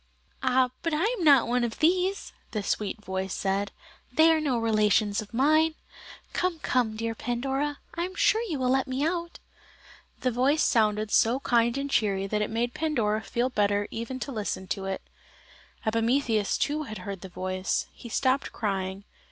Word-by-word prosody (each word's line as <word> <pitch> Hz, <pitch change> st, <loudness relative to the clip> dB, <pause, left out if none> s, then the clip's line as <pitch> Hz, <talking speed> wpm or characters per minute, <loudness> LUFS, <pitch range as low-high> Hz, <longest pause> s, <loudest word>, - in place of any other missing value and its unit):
"Ah, 255 Hz, -1 st, +3 dB
but 330 Hz, -2 st, 0 dB
I 310 Hz, -, +1 dB, 0.2 s
am -, -, -2 dB
not 280 Hz, -5 st, +6 dB
one 245 Hz, +1 st, +1 dB
of 230 Hz, -2 st, -2 dB
these," 365 Hz, +4 st, +1 dB, 0.2 s
the 210 Hz, -2 st, -2 dB
sweet 210 Hz, +1 st, -2 dB
voice 190 Hz, 0 st, -3 dB
said, 195 Hz, +1 st, -1 dB, 0.4 s
"they 315 Hz, +5 st, +6 dB
are 320 Hz, -1 st, +2 dB
no 275 Hz, -5 st, +1 dB
relations 215 Hz, -2 st, +2 dB
of 210 Hz, -, -11 dB
mine. 310 Hz, +6 st, +3 dB, 0.6 s
Come, 360 Hz, -2 st, 0 dB
come, 245 Hz, -7 st, 0 dB
dear 225 Hz, +1 st, -2 dB
Pandora, 270 Hz, +5 st, -2 dB, 0.2 s
I 340 Hz, +1 st, -1 dB
am 370 Hz, +1 st, -8 dB
sure 440 Hz, +3 st, +3 dB
you 310 Hz, -, -1 dB
will 255 Hz, -1 st, +1 dB
let 265 Hz, +1 st, +2 dB
me 260 Hz, +3 st, -1 dB
out." 340 Hz, 0 st, -2 dB, 0.8 s
The 255 Hz, -, +1 dB
voice 265 Hz, +6 st, +2 dB
sounded 215 Hz, -2 st, +2 dB
so 235 Hz, +4 st, +4 dB
kind 235 Hz, 0 st, +2 dB
and 280 Hz, 0 st, -2 dB
cheery 200 Hz, -7 st, +1 dB
that 210 Hz, +2 st, -1 dB
it 210 Hz, -, -1 dB
made 235 Hz, +2 st, -1 dB
Pandora 230 Hz, -9 st, 0 dB
feel 245 Hz, +3 st, -1 dB
better 205 Hz, -2 st, +1 dB
even 235 Hz, +3 st, -5 dB
to 280 Hz, -, -4 dB
listen 210 Hz, -5 st, -3 dB
to 195 Hz, -, -2 dB
it. 195 Hz, 0 st, -3 dB, 0.8 s
Epimetheus 225 Hz, -1 st, +1 dB
too 300 Hz, +1 st, 0 dB
had 220 Hz, -8 st, -6 dB
heard 195 Hz, -3 st, -5 dB
the 190 Hz, -, -8 dB
voice. 185 Hz, +1 st, -2 dB
He 235 Hz, -, -11 dB
stopped 260 Hz, +4 st, +1 dB
crying. 195 Hz, -2 st, -3 dB
240 Hz, 175 wpm, -27 LUFS, 210-280 Hz, 0.8 s, not